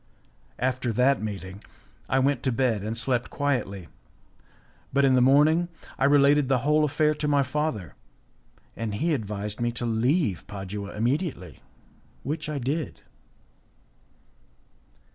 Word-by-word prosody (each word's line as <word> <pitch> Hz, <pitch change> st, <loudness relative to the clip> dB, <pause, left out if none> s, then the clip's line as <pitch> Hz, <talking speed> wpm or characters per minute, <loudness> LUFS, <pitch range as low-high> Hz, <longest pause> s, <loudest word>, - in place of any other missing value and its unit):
After 125 Hz, -1 st, -1 dB
that 125 Hz, +3 st, +3 dB
meeting, 100 Hz, -2 st, -6 dB, 0.5 s
I 130 Hz, -, +2 dB
went 135 Hz, -1 st, +2 dB
to 130 Hz, -, 0 dB
bed 115 Hz, -4 st, +1 dB
and 110 Hz, +3 st, -3 dB
slept 120 Hz, +1 st, 0 dB
quietly, 110 Hz, -11 st, -2 dB, 1.0 s
but 140 Hz, 0 st, +3 dB
in 135 Hz, -, +4 dB
the 130 Hz, -, +4 dB
morning 150 Hz, +6 st, +4 dB, 0.3 s
I -, -, +3 dB
related 145 Hz, 0 st, +4 dB
the 135 Hz, -, +4 dB
whole 150 Hz, +1 st, +4 dB
affair 150 Hz, +1 st, +2 dB
to 150 Hz, 0 st, -3 dB
my 145 Hz, -1 st, +3 dB
father, 130 Hz, -, -3 dB, 0.8 s
and 110 Hz, -3 st, -3 dB
he 160 Hz, +8 st, 0 dB
advised 105 Hz, -3 st, -4 dB
me 120 Hz, 0 st, +1 dB
to 120 Hz, -, -3 dB
leave 115 Hz, -, 0 dB
Padua 100 Hz, 0 st, -6 dB
immediately, 120 Hz, -, -2 dB, 0.6 s
which 150 Hz, +1 st, -3 dB
I 150 Hz, -, -2 dB
did. 140 Hz, +5 st, -3 dB
130 Hz, 130 wpm, -26 LUFS, 110-145 Hz, 1.0 s, in